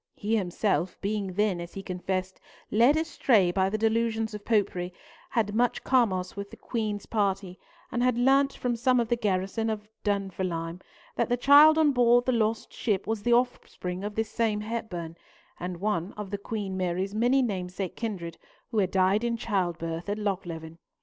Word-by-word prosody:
He 215 +2 -1
himself, 185 -2 0
being 200 -2 -2
then, 200 -2 +1
as 170 0 -9
he 195 - -6
confessed, 185 0 -3 0.3
led 240 +8 +5
astray 240 - +3
by 190 +1 +1
the 215 - -1
delusions 225 0 0
of 210 -1 -7
Popery, 190 -5 0 0.4
had 215 -3 0
much 245 +2 +1
commerce 190 -8 +1
with 200 0 -6
the - - -12
Queen's 215 -4 -3
party, 195 -3 -1 0.3
and 240 - -1
had 250 -1 +2
learnt 275 +3 +4
from 245 -1 -2
some 250 +1 +3
of 235 -2 0
the 240 - +3
garrison 205 0 -1
of 210 -1 -4 0.2
Dunfermline 185 -4 -2 0.4
that - - +1
the 245 - +2
child 290 +5 +7
on 310 -2 +5
board 245 -1 +4
the 255 - +2
lost 225 -2 0
ship 205 -5 -1
was 220 -1 -2
the 240 +2 +2
offspring 200 -6 -1
of 205 0 -4
this 220 -1 -1
same 220 -3 0
Hepburn, 185 -7 -5 0.4
and 180 0 -4
of 170 - -13
one 190 -3 -1
of 210 -1 -7
Queen 200 -3 -4
Mary's 185 +1 -1
many 245 +5 +3
namesake 185 -4 -3
kindred, 185 -8 -5 0.3
who 220 - +1
had 190 -2 +2
died 190 +3 +2
in 235 -1 0
childbirth 175 -5 -2
at 205 - -1
Lochleven. 175 -5 -4
210 Hz, 175 wpm, -27 LUFS, 185-230 Hz, 0.4 s, child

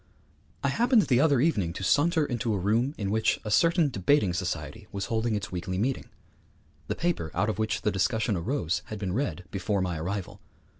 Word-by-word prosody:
I - - +2
happened 240 -2 +4
the 125 -2 +2
other 145 -3 +4
evening 105 - +1
to 95 - -6
saunter 155 - +3
into 120 -4 -1
a - - 0
room 115 - +1
in 100 -2 -2
which 110 +1 +1
a 105 - -4
certain 165 - +4
debating 100 -2 +2
society 90 +4 -4
was 100 -1 -3
holding 110 0 +1
its 100 -3 -4
weekly 90 +1 -3
meeting. 125 +7 -1 0.8
The - - -2
paper 170 - -1
out 100 +5 +1
of 110 - -3
which 110 0 -1
the 105 - +2
discussion 105 +3 +1
arose 90 - -1
had 110 - -6
been 95 -3 -3
read 125 -6 -2
before 100 +1 -1
my 90 -3 -1
arrival. 100 +3 -4
105 Hz, 195 wpm, -27 LUFS, 95-130 Hz, 0.8 s, happened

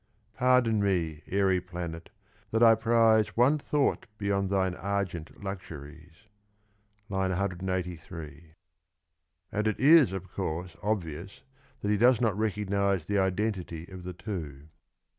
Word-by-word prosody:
— - - -41
Pardon 125 -4 +3
me, 85 -6 0
airy 95 -2 +2
planet, 85 -2 -7 0.4
that 115 +2 +2
I 115 -1 +8
prize 110 -1 +3
One 135 +6 +4
thought 145 -3 0
beyond 100 -2 0
thine 95 -2 +1
argent 95 -3 -4
luxuries! 80 -1 -9 0.8
(III. 95 -2 -1
183) 90 -4 -4 1.0
and 105 +1 0
it 110 - -1
is, 145 - +7
of 95 -1 -5
course, 90 -1 -4
obvious 95 -3 -3 0.4
that 105 - 0
he 105 - +3
does 120 +1 +5
not 115 -5 +1
recognise 100 -4 0
the 100 +2 +1
identity 95 -4 -1
of 95 -1 -9
the 90 0 -6
two. 80 -7 -7
95 Hz, 125 wpm, -29 LUFS, 85-105 Hz, 1.0 s, I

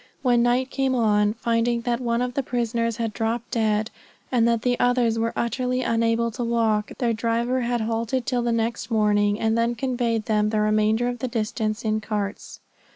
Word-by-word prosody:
When 245 -2 +3
night 245 +2 +1
came 270 -1 0
on, 210 -3 +2
finding 235 0 0
that 235 0 -1
one 235 0 0
of 250 0 -3
the 275 - 0
prisoners 230 -2 -1
had 225 -2 -2
dropped 225 +2 -2
dead, 220 0 0 0.4
and 235 -3 +3
that 230 -1 +1
the 245 -1 +1
others 245 -2 +2
were 230 +1 0
utterly 250 +2 -1
unable 230 0 +1
to 245 +2 -4
walk, 225 -3 +1
their 235 -2 +1
driver 235 +3 0
had 240 -1 -1
halted 230 +3 -1
till 245 -2 0
the 235 0 0
next 230 +1 -1
morning, 210 -2 +2
and 220 0 +1
then 230 +1 +1
conveyed 235 -3 -1
them 210 -1 +1
the 215 0 0
remainder 215 +2 +2
of 245 0 -3
the 255 - -2
distance 220 -2 -2
in 215 0 0
carts. 205 -2 -4
230 Hz, 190 wpm, -24 LUFS, 220-240 Hz, 0.4 s, When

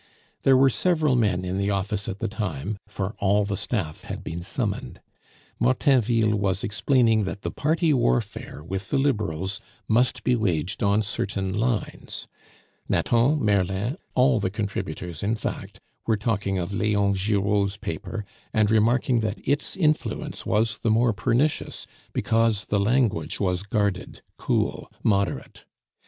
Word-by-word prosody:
There 135 -1 +5
were 135 0 +5
several 155 -3 +2
men 95 -6 +1
in 90 +2 -2
the 100 +1 0
office 100 +1 -1
at 95 - -4
the - - -2
time, 100 -3 -4
for 100 -1 -4
all 100 +1 +3
the 100 0 -2
staff 90 -7 -3
had - - -7
been 85 +1 -5
summoned; 65 - -3 0.6
Martainville 120 -3 +3
was 100 -2 0
explaining 115 -1 +2
that 95 +1 -5
the - - -2
party 160 +1 +1
warfare 65 - -1
with 95 +3 -5
the 140 - +1
Liberals 100 - -1 0.3
must 120 +3 +2
be 125 - +3
waged 95 -5 -1
on 100 +2 +3
certain 95 -1 -2
lines. 110 -1 -2 0.6
Nathan, 125 +4 +2
Merlin, 100 +4 +1 0.2
all 130 -2 +4
the 95 - 0
contributors, 90 -5 -4
in 105 +3 0
fact, - - -5 0.3
were 110 -2 +3
talking 100 -3 -1
of 90 +2 -3
Leon 100 -1 +2
Giraud's 100 0 +1
paper, 105 +4 -5 0.3
and 110 -1 +2
remarking 120 +3 +3
that 110 -2 -3
its 145 +2 0
influence 155 -4 -1
was 110 +1 +1
the 115 - 0
more 115 +1 +3
pernicious 120 +10 0 0.3
because 115 -2 +1
the 100 - 0
language 105 - +1
was 90 -2 0
guarded, 100 -1 -2
cool, - - -1
moderate. 100 -3 0
105 Hz, 145 wpm, -25 LUFS, 95-120 Hz, 0.6 s, There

